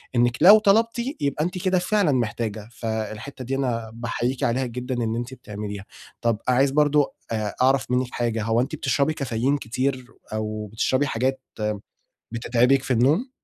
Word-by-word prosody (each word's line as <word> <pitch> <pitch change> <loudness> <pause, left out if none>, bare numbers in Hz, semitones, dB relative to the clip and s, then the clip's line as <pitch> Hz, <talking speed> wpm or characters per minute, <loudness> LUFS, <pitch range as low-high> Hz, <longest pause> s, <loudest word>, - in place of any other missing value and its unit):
إنِّك 120 +1 +3
لو 200 +6 +9
طلبتِ، 225 +3 +3 0.2
يبقى 145 +1 0
أنتِ 180 +1 -3
كده 185 -1 +3
فعلًا 190 -3 +2
محتاجة، 110 -3 -2
فالحتّة 110 +3 -5
دي 135 +3 -2
أنا 115 -4 -2
باحييكِ 120 +2 -2
عليها 125 +3 +1
جدًا 125 +1 -4
إن 110 0 -1
أنتِ 120 +2 -4
بتعمليها، 105 -4 -7 0.4
طَب 115 -2 +1
عايز 130 +2 +3
برضه 150 0 +3 0.2
آآ 105 -2 -2
أعرف 130 -1 +3
منِّك 125 0 +1
حاجة، 115 -2 -1
هو 115 +2 +2
أنتِ 140 +5 -3
بتشربي 140 +1 +1
كافيين 135 0 0
كتير، 130 +1 -2 0.3
أو 110 0 -3
بتشربي 130 +5 +1
حاجات 130 +2 -1 0.9
بتتعبِك 125 +3 +2
في 135 - -1
النوم؟ 150 - +2
125 Hz, 155 wpm, -24 LUFS, 115-140 Hz, 0.9 s, لو